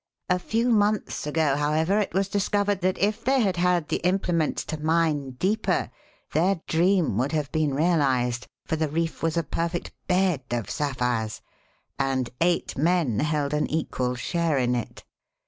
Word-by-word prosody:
A 180 Hz, 0 st, +2 dB
few 230 Hz, +6 st, 0 dB
months 210 Hz, -7 st, +1 dB
ago, 150 Hz, -2 st, +2 dB
however, 155 Hz, +7 st, +1 dB
it 210 Hz, -, -1 dB
was 195 Hz, 0 st, +1 dB
discovered 205 Hz, 0 st, 0 dB
that 185 Hz, +1 st, +1 dB
if 205 Hz, +2 st, 0 dB
they 265 Hz, +2 st, +3 dB
had 190 Hz, -5 st, +1 dB
had 175 Hz, -3 st, +2 dB
the -, -, 0 dB
implements 180 Hz, -3 st, 0 dB
to 155 Hz, -1 st, -5 dB
mine 155 Hz, -4 st, +1 dB
deeper, 200 Hz, +9 st, 0 dB, 0.4 s
their 180 Hz, +3 st, +2 dB
dream 170 Hz, -, +2 dB
would 135 Hz, +5 st, 0 dB
have 150 Hz, -3 st, -1 dB
been 155 Hz, -4 st, 0 dB
realized, 135 Hz, -7 st, +1 dB, 0.2 s
for 160 Hz, -, -1 dB
the 155 Hz, -1 st, 0 dB
reef 165 Hz, +2 st, -2 dB
was 165 Hz, 0 st, 0 dB
a 170 Hz, -, +2 dB
perfect 170 Hz, +3 st, -3 dB, 0.2 s
bed 180 Hz, -5 st, +2 dB
of 120 Hz, -3 st, -2 dB
sapphires 125 Hz, -6 st, -2 dB, 0.6 s
and 135 Hz, -2 st, 0 dB
eight 170 Hz, 0 st, +1 dB
men 155 Hz, -, +1 dB
held 150 Hz, -1 st, 0 dB
an 150 Hz, -, 0 dB
equal 130 Hz, -5 st, -1 dB
share 165 Hz, +3 st, 0 dB
in 125 Hz, -1 st, +1 dB
it. 120 Hz, -2 st, -4 dB
160 Hz, 165 wpm, -25 LUFS, 140-180 Hz, 0.6 s, they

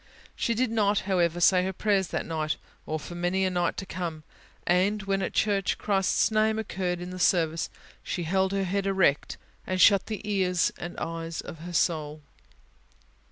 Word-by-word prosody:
She 230 Hz, -, 0 dB
did 245 Hz, 0 st, +1 dB
not, 210 Hz, -2 st, +2 dB
however, 175 Hz, -3 st, +1 dB
say 180 Hz, +1 st, +5 dB
her 190 Hz, -, -1 dB
prayers 195 Hz, -1 st, +1 dB
that -, -, -3 dB
night, 155 Hz, -2 st, -2 dB, 0.3 s
or 155 Hz, 0 st, -2 dB
for 175 Hz, -, -9 dB
many 175 Hz, +2 st, 0 dB
a 185 Hz, -, 0 dB
right 175 Hz, -1 st, 0 dB
to 195 Hz, -, -4 dB
come; 170 Hz, -5 st, -5 dB, 0.4 s
and 195 Hz, +4 st, +2 dB
when, 195 Hz, 0 st, 0 dB
at -, -, -2 dB
church, 200 Hz, -3 st, +1 dB
Christ's 200 Hz, +1 st, +1 dB
name 215 Hz, 0 st, +2 dB
occurred 185 Hz, -5 st, -2 dB
in 180 Hz, +1 st, -6 dB
the 185 Hz, -, -7 dB
Service, 165 Hz, -3 st, +2 dB, 0.3 s
she 175 Hz, -, -3 dB
held 190 Hz, +3 st, +1 dB
her 195 Hz, 0 st, 0 dB
head 195 Hz, +1 st, -1 dB
erect, 190 Hz, -7 st, +2 dB, 0.3 s
and 185 Hz, 0 st, -1 dB
shut 200 Hz, 0 st, +6 dB
the 215 Hz, -1 st, -5 dB
ears 185 Hz, -4 st, +1 dB
and 175 Hz, +1 st, -6 dB
eyes 165 Hz, 0 st, -4 dB
of 165 Hz, -, -9 dB
her 175 Hz, +2 st, -8 dB
soul. 155 Hz, -3 st, 0 dB
185 Hz, 180 wpm, -27 LUFS, 170-200 Hz, 0.4 s, shut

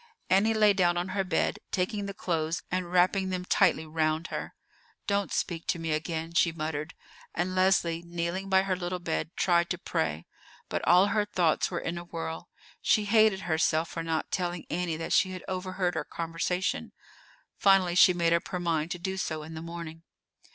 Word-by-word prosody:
Annie 210 Hz, +4 st, +4 dB
lay 210 Hz, -1 st, +5 dB
down 175 Hz, -3 st, +2 dB
on 175 Hz, +2 st, -2 dB
her 195 Hz, 0 st, 0 dB
bed, 180 Hz, -3 st, 0 dB
taking 200 Hz, +2 st, -1 dB
the 200 Hz, -, -5 dB
clothes 165 Hz, -2 st, -2 dB
and 180 Hz, -1 st, -2 dB
wrapping 185 Hz, +2 st, +3 dB
them 180 Hz, -1 st, -3 dB
tightly 160 Hz, -3 st, +3 dB
round 155 Hz, +1 st, -1 dB
her. -, -, -5 dB, 0.5 s
"Don't 200 Hz, -1 st, 0 dB
speak 165 Hz, -2 st, -2 dB
to -, -, +1 dB
me 165 Hz, -1 st, -3 dB
again," 160 Hz, +1 st, -2 dB
she 170 Hz, 0 st, +3 dB
muttered; 155 Hz, -1 st, -4 dB, 0.4 s
and 180 Hz, +2 st, -1 dB
Leslie, 185 Hz, -3 st, +2 dB
kneeling 170 Hz, +3 st, -3 dB
by 190 Hz, 0 st, +4 dB
her 190 Hz, -1 st, 0 dB
little 180 Hz, 0 st, -3 dB
bed, 170 Hz, -3 st, -2 dB
tried 170 Hz, -1 st, +2 dB
to 180 Hz, -, -1 dB
pray. 80 Hz, -, -2 dB, 0.4 s
But -, -, -2 dB
all 180 Hz, +3 st, +6 dB
her 210 Hz, +1 st, +2 dB
thoughts 175 Hz, -6 st, +1 dB
were 170 Hz, -, -2 dB
in 170 Hz, +1 st, -3 dB
a -, -, -8 dB
whirl. 165 Hz, 0 st, -6 dB, 0.3 s
She 215 Hz, -, +3 dB
hated 215 Hz, -2 st, +4 dB
herself 160 Hz, -1 st, +1 dB
for 165 Hz, -, -4 dB
not 165 Hz, -1 st, -2 dB
telling 175 Hz, -2 st, -2 dB
Annie 170 Hz, -2 st, -1 dB
that 165 Hz, -, -3 dB
she 185 Hz, -1 st, +3 dB
had 185 Hz, -, -7 dB
overheard 185 Hz, -1 st, -2 dB
her -, -, -2 dB
conversation. 170 Hz, +2 st, -2 dB, 0.7 s
Finally, 195 Hz, -3 st, +4 dB
she 180 Hz, +1 st, +7 dB
made 170 Hz, -2 st, +2 dB
up 170 Hz, -, 0 dB
her 180 Hz, -, -3 dB
mind 165 Hz, -2 st, 0 dB
to 180 Hz, -, -3 dB
do 190 Hz, +2 st, -4 dB
so 155 Hz, -4 st, -3 dB
in 160 Hz, +1 st, -9 dB
the 160 Hz, -, -6 dB
morning. 165 Hz, -1 st, -7 dB
175 Hz, 190 wpm, -28 LUFS, 165-185 Hz, 0.7 s, she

